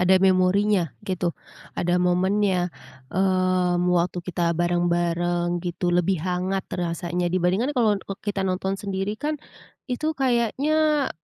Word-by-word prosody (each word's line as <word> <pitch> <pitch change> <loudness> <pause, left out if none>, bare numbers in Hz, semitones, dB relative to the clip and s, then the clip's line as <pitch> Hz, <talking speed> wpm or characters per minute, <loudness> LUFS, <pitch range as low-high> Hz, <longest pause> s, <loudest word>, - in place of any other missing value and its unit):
ada 185 +1 +5
memorinya 185 0 +3 0.2
gitu, 180 -3 -2 0.4
ada 175 +1 +1
momennya, 180 0 +1 0.4
eee, 185 -1 +2 0.2
waktu 175 +1 +1
kita 170 -1 -1
bareng-bareng, 175 0 0
gitu, 175 0 -2
lebih 180 +2 +2
hangat 185 +1 -1
rasanya 175 0 -2
dibandingkan 185 +10 0
kalau 225 -4 +4
e 195 - -7
kita 205 -2 -2
nonton 190 0 -1
sendiri, 200 +1 -3
kan. 300 +1 -1 0.5
Itu 305 +4 -2
kayaknya, 280 +4 +1
185 Hz, 115 wpm, -24 LUFS, 175-205 Hz, 0.5 s, ada